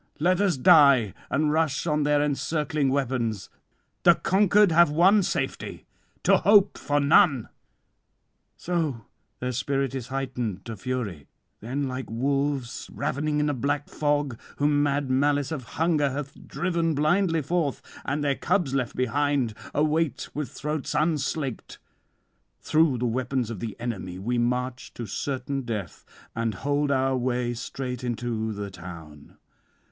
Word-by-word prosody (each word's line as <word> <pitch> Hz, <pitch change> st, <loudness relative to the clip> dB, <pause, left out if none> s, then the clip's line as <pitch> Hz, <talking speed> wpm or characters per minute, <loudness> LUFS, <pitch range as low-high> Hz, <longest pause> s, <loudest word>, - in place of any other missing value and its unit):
Let 180 Hz, +4 st, +2 dB
us 190 Hz, -7 st, +2 dB
die, 140 Hz, -, +6 dB, 0.2 s
and 150 Hz, 0 st, +1 dB
rush 155 Hz, -2 st, +1 dB
on 150 Hz, -2 st, +1 dB
their 145 Hz, 0 st, +2 dB
encircling 150 Hz, 0 st, 0 dB
weapons. 125 Hz, -7 st, -1 dB, 0.5 s
The -, -, +6 dB
conquered 205 Hz, 0 st, +3 dB
have 170 Hz, 0 st, +6 dB
one 185 Hz, +7 st, +5 dB
safety, -, -, -3 dB, 0.4 s
to -, -, +5 dB
hope 205 Hz, -1 st, +4 dB
for 145 Hz, 0 st, 0 dB
none." 145 Hz, -, +4 dB, 1.1 s
'So 160 Hz, -9 st, -2 dB, 0.3 s
their 125 Hz, 0 st, -2 dB
spirit 135 Hz, +2 st, -1 dB
is 130 Hz, -3 st, -5 dB
heightened 125 Hz, -7 st, -3 dB
to 115 Hz, -, -5 dB
fury. 105 Hz, -, -4 dB, 0.3 s
Then, 135 Hz, +6 st, -3 dB
like 130 Hz, 0 st, -5 dB
wolves 135 Hz, +1 st, -1 dB
ravening 150 Hz, +1 st, -1 dB
in 150 Hz, -, +1 dB
a 145 Hz, -, +1 dB
black 145 Hz, +3 st, -2 dB
fog, 145 Hz, -5 st, -1 dB, 0.2 s
whom 145 Hz, 0 st, +2 dB
mad 140 Hz, -2 st, 0 dB
malice 145 Hz, +2 st, +1 dB
of 140 Hz, -6 st, -4 dB
hunger 160 Hz, -3 st, +2 dB
hath 140 Hz, +1 st, -7 dB
driven 170 Hz, -3 st, -1 dB
blindly 165 Hz, +2 st, +2 dB
forth, 160 Hz, -2 st, -1 dB, 0.2 s
and 145 Hz, +2 st, -2 dB
their 140 Hz, -1 st, +2 dB
cubs 175 Hz, -2 st, 0 dB
left 130 Hz, -3 st, -1 dB
behind 135 Hz, -2 st, 0 dB, 0.2 s
await 150 Hz, -2 st, 0 dB
with 150 Hz, -2 st, -3 dB
throats 150 Hz, 0 st, -4 dB
unslaked; 150 Hz, -4 st, -1 dB, 0.8 s
through 155 Hz, -4 st, +2 dB
the 125 Hz, -, -1 dB
weapons 125 Hz, 0 st, -1 dB
of 110 Hz, -, -6 dB
the 110 Hz, 0 st, -6 dB
enemy 95 Hz, -7 st, -4 dB
we 120 Hz, +6 st, -1 dB
march 125 Hz, +1 st, -2 dB
to 120 Hz, -, -5 dB
certain 135 Hz, +5 st, -3 dB
death, 110 Hz, -, -5 dB, 0.3 s
and 115 Hz, -2 st, -1 dB
hold 145 Hz, 0 st, +1 dB
our 135 Hz, -1 st, +2 dB
way 125 Hz, -1 st, -1 dB
straight 125 Hz, +1 st, -5 dB
into 115 Hz, -2 st, -2 dB
the 100 Hz, -1 st, -5 dB
town. 85 Hz, -5 st, -11 dB
140 Hz, 140 wpm, -26 LUFS, 120-150 Hz, 1.1 s, die